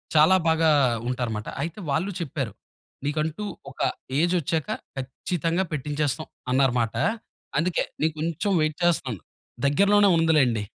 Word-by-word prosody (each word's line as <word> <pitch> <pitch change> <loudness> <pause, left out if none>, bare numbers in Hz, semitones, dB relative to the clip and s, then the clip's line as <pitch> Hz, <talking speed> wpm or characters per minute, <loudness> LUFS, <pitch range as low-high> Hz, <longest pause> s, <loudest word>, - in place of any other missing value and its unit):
చాలా 155 +5 +7
బాగా 160 0 +4 0.4
ఉంటారుమాట. 115 -4 -2
అయితే 165 +7 -4
వాళ్ళు 160 +8 0
చెప్పారు, 140 -7 -3 0.5
"నీకంటూ 155 +5 -1 0.3
ఒక - - -19 0.4
ఏజొచ్చాక, 165 -3 +1 0.3
ఖచ్చితంగా 165 +6 -1
పెట్టించేస్తాం" 150 0 -2 0.2
అన్నారుమాట. 125 -4 +2 0.6
అందుకే 175 +2 +1 0.2
నేను 160 0 +2
కొంచెం 165 +5 -1
వైట్ 155 0 0
చేస్తనను. 135 - +1 0.5
దగ్గరలోనే 200 +6 +5
ఉందిలెండి. 135 -10 +3
155 Hz, 105 wpm, -25 LUFS, 135-170 Hz, 0.6 s, చాలా